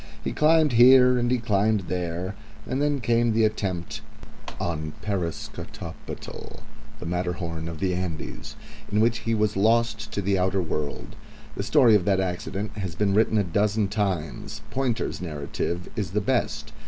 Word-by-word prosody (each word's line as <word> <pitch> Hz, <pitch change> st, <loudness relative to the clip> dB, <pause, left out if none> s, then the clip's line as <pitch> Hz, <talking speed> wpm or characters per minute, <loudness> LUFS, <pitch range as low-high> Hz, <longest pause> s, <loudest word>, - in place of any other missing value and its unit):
He -, -, -2 dB
climbed 155 Hz, -1 st, +4 dB
here 125 Hz, +1 st, +7 dB
and 120 Hz, 0 st, +1 dB
he 125 Hz, -, +3 dB
climbed 110 Hz, -2 st, +1 dB
there, 90 Hz, +1 st, -3 dB, 0.3 s
and 130 Hz, +2 st, -2 dB
then 145 Hz, -2 st, +1 dB
came 115 Hz, 0 st, +2 dB
the 110 Hz, 0 st, +4 dB
attempt 95 Hz, -5 st, -2 dB, 0.6 s
on 75 Hz, -3 st, -3 dB
Parascotopetl, 95 Hz, -6 st, -6 dB, 0.4 s
the -, -, -7 dB
Matterhorn 85 Hz, -2 st, -3 dB
of 80 Hz, -2 st, -6 dB
the 95 Hz, +1 st, 0 dB
Andes, 90 Hz, -3 st, -5 dB, 0.4 s
in 105 Hz, -, +2 dB
which 115 Hz, +1 st, +3 dB
he 115 Hz, 0 st, -1 dB
was 105 Hz, 0 st, +1 dB
lost 110 Hz, +1 st, +2 dB
to 100 Hz, -, -2 dB
the 95 Hz, 0 st, +1 dB
outer 95 Hz, +1 st, +1 dB
world. 75 Hz, -4 st, -3 dB, 0.4 s
The -, -, -3 dB
story 120 Hz, +3 st, +5 dB
of 100 Hz, -5 st, +4 dB
the 95 Hz, -2 st, +3 dB
accident 95 Hz, +3 st, -3 dB
has 95 Hz, -5 st, -4 dB
been 100 Hz, +2 st, +1 dB
written 110 Hz, +1 st, +3 dB
a 105 Hz, -, +3 dB
dozen 100 Hz, +3 st, +1 dB
times. 95 Hz, -7 st, -2 dB
Pointer's 125 Hz, -7 st, -1 dB
narrative 85 Hz, +2 st, -3 dB
is 100 Hz, -5 st, -3 dB
the 105 Hz, -, +2 dB
best. -, -, -1 dB
100 Hz, 155 wpm, -25 LUFS, 90-115 Hz, 0.6 s, here